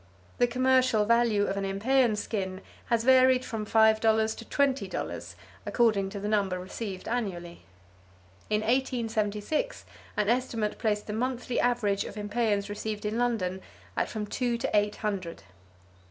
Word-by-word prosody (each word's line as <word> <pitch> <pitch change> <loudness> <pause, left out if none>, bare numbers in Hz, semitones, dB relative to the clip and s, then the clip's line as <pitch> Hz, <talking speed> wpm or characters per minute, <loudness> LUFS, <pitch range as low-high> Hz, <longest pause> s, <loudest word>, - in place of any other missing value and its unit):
The 245 - +5
commercial 255 -3 +3
value 230 -2 +3
of 195 - -2
an 200 - -1
impeyan 220 +4 +2
skin 190 -3 -3 0.3
has 230 -1 +1
varied 260 0 +5
from 220 -3 -4
five 220 0 +4
dollars 220 0 +2
to 230 - -9
twenty 275 +1 +1
dollars, - - -5 0.3
according 215 -5 +2
to 200 0 -6
the 205 - -4
number 200 -3 +1
received 190 +1 -6
annually. 185 -8 -4 0.8
In 210 0 +1
1876 230 - -1 0.3
an 210 - +1
estimate 230 -3 0
placed 210 -2 0
the 210 - -5
monthly 250 +1 -2
average 220 -5 +1
of - - -8
impeyans 205 -1 0
received 210 0 -4
in 215 +2 -1
London 195 -7 0 0.3
at - - 0
from 215 -1 -4
two 240 +2 -1
to 240 -1 -2
eight 205 0 +2
hundred. 190 - -4
220 Hz, 150 wpm, -28 LUFS, 205-240 Hz, 0.8 s, The